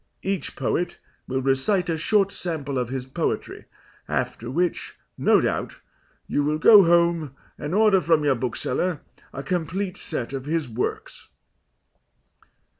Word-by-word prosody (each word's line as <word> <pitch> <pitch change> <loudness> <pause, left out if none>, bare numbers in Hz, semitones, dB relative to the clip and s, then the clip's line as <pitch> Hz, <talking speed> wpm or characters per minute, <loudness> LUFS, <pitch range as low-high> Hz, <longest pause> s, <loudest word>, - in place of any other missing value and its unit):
Each 195 -1 -2
poet 175 0 -2 0.3
will 130 0 -2
recite 135 +8 +1
a 165 - 0
short 200 +4 +2
sample 145 -8 -3
of 125 -2 -2
his 130 -1 -4
poetry, 130 - -3 0.4
after 120 - -2
which, 175 +6 -1 0.2
no - - +4
doubt, - - -2 0.5
you 145 - 0
will 150 +1 0
go 205 +5 +8
home 170 -4 +2 0.2
and 150 +5 -4
order 210 -3 +5
from 165 -3 +2
your 145 -2 +3
bookseller 130 +7 -2 0.3
a 135 - -6
complete 180 +4 -2
set 120 +2 -4
of 135 -1 -4
his 160 -2 -1
works." 120 +1 -4
160 Hz, 135 wpm, -24 LUFS, 135-180 Hz, 0.5 s, go